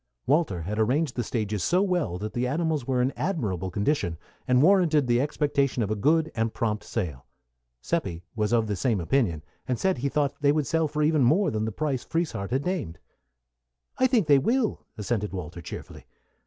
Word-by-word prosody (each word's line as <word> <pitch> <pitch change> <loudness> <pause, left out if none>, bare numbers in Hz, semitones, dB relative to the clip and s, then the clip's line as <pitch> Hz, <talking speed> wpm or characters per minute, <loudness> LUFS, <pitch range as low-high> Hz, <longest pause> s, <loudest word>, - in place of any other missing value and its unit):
Walter 135 - +1
had 105 +6 -3
arranged 130 +6 +1
the 120 - -1
stages 105 -4 -2
so 180 +3 +3
well 175 - 0
that 105 +3 -5
the 125 +1 0
animals 155 -2 -1
were 125 -2 +2
in 130 - 0
admirable 100 - -2
condition, 100 - 0 0.3
and 125 +1 +4
warranted 165 -6 +4
the 120 0 +2
expectation 140 -3 0
of 105 - -2
a - - +1
good 155 +9 +2
and 115 0 -1
prompt 105 -2 -1
sale. 80 - -4 0.6
Seppi 95 - -2
was 105 -1 0
of 115 -2 +3
the 105 -1 -2
same 110 +1 0
opinion, 85 - 0 0.2
and 125 - 0
said 190 -3 0
he 140 +3 0
thought 145 -1 0
they 140 -1 +4
would 150 -1 +1
sell 160 +3 +1
for 150 +1 -1
even 155 -1 +3
more 165 +11 +3
than 110 0 -1
the 110 - -2
price 135 +1 -2
Frieshardt 165 - -2
had 135 +3 -1
named. 175 - -2 1.0
"I 260 - +5
think 240 -7 +2
they 145 -2 +5
will," 230 - 0
assented 105 -1 -2
Walter, 85 -2 -6
cheerfully. - - -9
125 Hz, 195 wpm, -26 LUFS, 105-155 Hz, 1.0 s, I